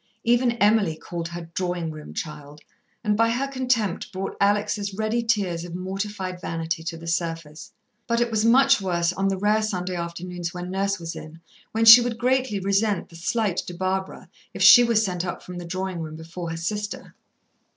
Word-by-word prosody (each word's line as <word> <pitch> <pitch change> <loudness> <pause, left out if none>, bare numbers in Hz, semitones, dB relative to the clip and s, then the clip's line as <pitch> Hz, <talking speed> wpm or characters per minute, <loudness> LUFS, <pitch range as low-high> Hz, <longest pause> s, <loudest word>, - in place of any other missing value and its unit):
Even 240 +1 +3
Emily 210 -6 +3
called 170 0 -5
her 170 -1 -8
"drawing 175 -3 -2
room 155 -1 -10
child," 150 -1 -7 0.4
and 210 -2 +1
by 230 +2 +3
her 250 +4 0
contempt 250 -9 -1
brought 195 0 -4
Alex' 205 0 +1
ready 220 +3 0
tears 200 -8 0
of 175 -1 -7
mortified 190 0 -4
vanity 165 0 -3
to 165 - -4
the 165 - -11
surface. 165 -2 -3 0.4
But 235 0 +1
it 240 -1 0
was 215 -1 +1
much 270 +1 +5
worse 175 -2 0
on 195 +1 0
the 195 -1 0
rare 210 +3 +2
Sunday 185 -4 -2
afternoons 175 0 -5
when 180 +1 -5
Nurse 195 0 -1
was 165 -1 -6
in, 155 +1 -10 0.3
when 225 +1 +1
she 225 +2 +11
would 240 -1 -2
greatly 255 -3 +1
resent 200 0 0
the 170 - -15
slight 195 +2 -1
to 175 - -4
Barbara 190 +1 -3 0.3
if - - 0
she 245 - +10
was 230 -2 +2
sent 180 -2 -2
up 180 - -5
from 180 -1 -8
the 175 - -7
drawing 185 0 -4
room 155 -1 -6
before 165 +2 -7
her 165 - -4
sister. 205 +5 -4
190 Hz, 190 wpm, -24 LUFS, 170-215 Hz, 0.4 s, she